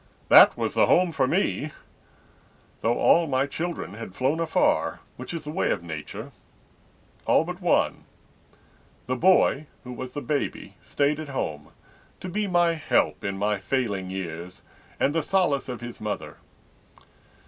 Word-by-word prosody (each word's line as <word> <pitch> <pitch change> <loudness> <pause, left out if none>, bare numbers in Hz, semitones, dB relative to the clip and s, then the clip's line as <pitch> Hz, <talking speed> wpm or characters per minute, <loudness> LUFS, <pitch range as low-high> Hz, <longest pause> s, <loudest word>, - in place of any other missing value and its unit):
That - - +8
was - - -1
the - - +4
home 180 -1 +4
for 130 - +1
me, 165 -2 0 1.1
Though 115 +2 +1
all 170 -1 +4
my 130 -1 +1
children 160 - -4
had 105 -3 -9
flown 135 +5 0
afar— 165 -1 +1
Which 130 - -8
is 165 -3 -5
the 150 - -6
way 180 - 0
of - - -1
Nature—all 80 -3 -5
but - - -7
one. - - +1 1.0
The 130 - -1
boy, 155 -2 +3 0.2
who 125 -1 -8
was 125 +1 -7
the 145 - -4
baby, 145 -1 -3
stayed 145 +1 0
at 155 -2 -6
home, 75 - -4 0.5
To 185 - -6
be 205 +3 -1
my 175 -2 +3
help 155 - 0
in 100 -1 -3
my 105 0 0
failing 100 -5 -2
years 90 -2 -6 0.4
And 140 - +2
the 165 - +1
solace 175 -9 +1
of 125 -2 -5
his 120 0 -8
mother. 105 -1 -5
135 Hz, 150 wpm, -25 LUFS, 105-165 Hz, 1.1 s, That